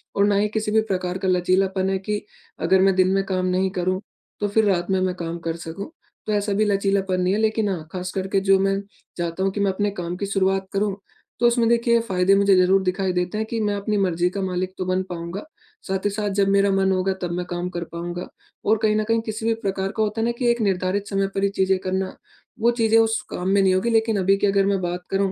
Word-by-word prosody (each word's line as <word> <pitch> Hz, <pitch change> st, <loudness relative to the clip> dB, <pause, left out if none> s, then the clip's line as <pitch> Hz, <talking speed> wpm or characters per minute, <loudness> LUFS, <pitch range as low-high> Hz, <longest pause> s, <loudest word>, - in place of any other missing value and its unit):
और 200 Hz, -, +4 dB
ना 205 Hz, 0 st, +2 dB
ही 205 Hz, +1 st, +2 dB
किसी 215 Hz, -1 st, -1 dB
भी 220 Hz, 0 st, +4 dB
प्रकार 185 Hz, -3 st, -2 dB
का 190 Hz, 0 st, -3 dB
लचीलापन 185 Hz, +1 st, +1 dB
है 195 Hz, -, +1 dB
कि 210 Hz, +2 st, -3 dB, 0.4 s
अगर 190 Hz, 0 st, +4 dB
मैं 195 Hz, -1 st, +4 dB
दिन 185 Hz, 0 st, +4 dB
में 195 Hz, 0 st, +2 dB
काम 185 Hz, -1 st, -1 dB
नहीं 185 Hz, +1 st, +1 dB
करूँ 185 Hz, +1 st, 0 dB, 0.4 s
तो 205 Hz, -, 0 dB
फिर 215 Hz, +2 st, +2 dB
रात 175 Hz, -3 st, +1 dB
में 190 Hz, -, +2 dB
मैं 185 Hz, -1 st, 0 dB
काम 170 Hz, -1 st, -4 dB
कर 165 Hz, -, -1 dB
सकूँ। 170 Hz, -, -7 dB, 0.4 s
तो 215 Hz, -, -2 dB
ऐसा 205 Hz, 0 st, 0 dB
भी 215 Hz, +2 st, +2 dB
लचीलापन 195 Hz, -2 st, +1 dB
नहीं 180 Hz, +1 st, +2 dB
है 210 Hz, -, 0 dB
लेकिन 220 Hz, -1 st, +1 dB
हाँ 165 Hz, -5 st, -4 dB
ख़ास 180 Hz, -1 st, -4 dB
करके 195 Hz, +1 st, 0 dB
जो 195 Hz, -, +7 dB
मैं 195 Hz, 0 st, +1 dB, 0.4 s
चाहता 170 Hz, +2 st, -2 dB
हूँ 195 Hz, -, +1 dB
कि 205 Hz, -, -5 dB
मैं 200 Hz, -1 st, +2 dB
अपने 205 Hz, +2 st, -1 dB
काम 175 Hz, -3 st, -4 dB
की 200 Hz, -, -3 dB
शुरुआत 195 Hz, -1 st, 0 dB
करूँ 200 Hz, 0 st, 0 dB, 0.4 s
तो 240 Hz, -, +5 dB
उसमें 235 Hz, -1 st, +2 dB
देखिए 235 Hz, 0 st, +3 dB
फ़ायदे 185 Hz, +1 st, +3 dB
मुझे 200 Hz, -1 st, +4 dB
ज़रूर 185 Hz, +1 st, +4 dB
दिखाई 185 Hz, 0 st, 0 dB
देते 180 Hz, +3 st, -1 dB
हैं 220 Hz, -, -2 dB
कि 230 Hz, -, -2 dB
मैं 205 Hz, -1 st, 0 dB
अपनी 205 Hz, +1 st, -1 dB
मर्जी 180 Hz, -3 st, +1 dB
का 195 Hz, +2 st, -4 dB
मालिक 185 Hz, 0 st, -2 dB
तो 185 Hz, -, -3 dB
बन 185 Hz, +1 st, 0 dB
पाऊँगा 170 Hz, +3 st, -5 dB, 0.4 s
साथ 190 Hz, +1 st, -2 dB
ही -, -, +3 dB
साथ 205 Hz, 0 st, -2 dB
जब 195 Hz, -, +4 dB
मेरा 200 Hz, 0 st, +3 dB
मन 195 Hz, 0 st, +2 dB
होगा 190 Hz, +1 st, +1 dB
तब 175 Hz, -1 st, -2 dB
मैं 180 Hz, +1 st, -3 dB
काम 175 Hz, +1 st, -3 dB
कर 175 Hz, -, -2 dB
पाऊँगा 175 Hz, +1 st, -5 dB, 0.4 s
और 220 Hz, +2 st, +4 dB
कहीं 215 Hz, -1 st, +3 dB
न 215 Hz, -, +1 dB
कहीं 225 Hz, +1 st, +1 dB
किसी 220 Hz, 0 st, -5 dB
भी 225 Hz, -, +3 dB
प्रकार 195 Hz, 0 st, -1 dB
का 220 Hz, -, +3 dB
होता 215 Hz, +1 st, -2 dB
है -, -, +1 dB
ना 235 Hz, -, +1 dB
कि 245 Hz, -2 st, +2 dB
एक 235 Hz, 0 st, -1 dB
निर्धारित 195 Hz, 0 st, 0 dB
समय 195 Hz, -1 st, 0 dB
पर 195 Hz, -, 0 dB
ही 200 Hz, -, +3 dB
चीज़ें 190 Hz, 0 st, +3 dB
करना 190 Hz, 0 st, -2 dB, 0.4 s
वो 235 Hz, +2 st, +4 dB
चीज़ें 225 Hz, 0 st, +4 dB
उस 225 Hz, 0 st, +2 dB
काम 180 Hz, -, -4 dB
में 200 Hz, 0 st, +4 dB
नहीं 190 Hz, -1 st, +4 dB
होगी। 185 Hz, +5 st, +1 dB
लेकिन 225 Hz, -1 st, +2 dB
अभी 195 Hz, +1 st, +3 dB
की 205 Hz, -, +1 dB
अगर 195 Hz, 0 st, +3 dB
मैं 195 Hz, -1 st, +1 dB
बात 175 Hz, 0 st, -3 dB
करूँ 195 Hz, 0 st, +1 dB
195 Hz, 260 wpm, -23 LUFS, 185-205 Hz, 0.4 s, जो